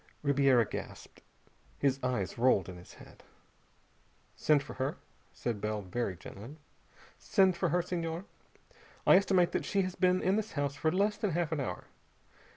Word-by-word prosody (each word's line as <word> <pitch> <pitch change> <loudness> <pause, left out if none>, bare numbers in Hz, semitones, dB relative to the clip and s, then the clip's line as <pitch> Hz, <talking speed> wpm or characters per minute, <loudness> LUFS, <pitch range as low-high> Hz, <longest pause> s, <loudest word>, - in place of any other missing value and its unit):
Ribiera 135 -4 +4
gasped. - - -8 0.6
His 135 -1 +1
eyes 125 -7 -1
rolled 120 -7 +3
in 90 - -8
his 90 - -14
head. - - -15 1.1
"Send 150 -2 +3
for 140 - -9
her," 135 +2 -2 0.3
said 115 -4 -4
Bell 105 -1 -2
very 95 -1 -3
gently. 115 - -10 0.6
"Send 190 -3 +3
for 170 0 0
her, 175 +3 +1
Senhor. 170 0 -3 0.8
I - - +7
estimate 185 -3 +3
that - - -1
she 195 -1 +1
has 185 0 -3
been 185 0 +2
in 190 +3 +2
this 220 0 -3
house 145 -1 -1
for 155 +3 0
less 205 +4 +1
than 210 -5 -1
half 170 -1 -1
an 160 - -1
hour. 90 -10 -4
150 Hz, 160 wpm, -31 LUFS, 125-180 Hz, 1.1 s, I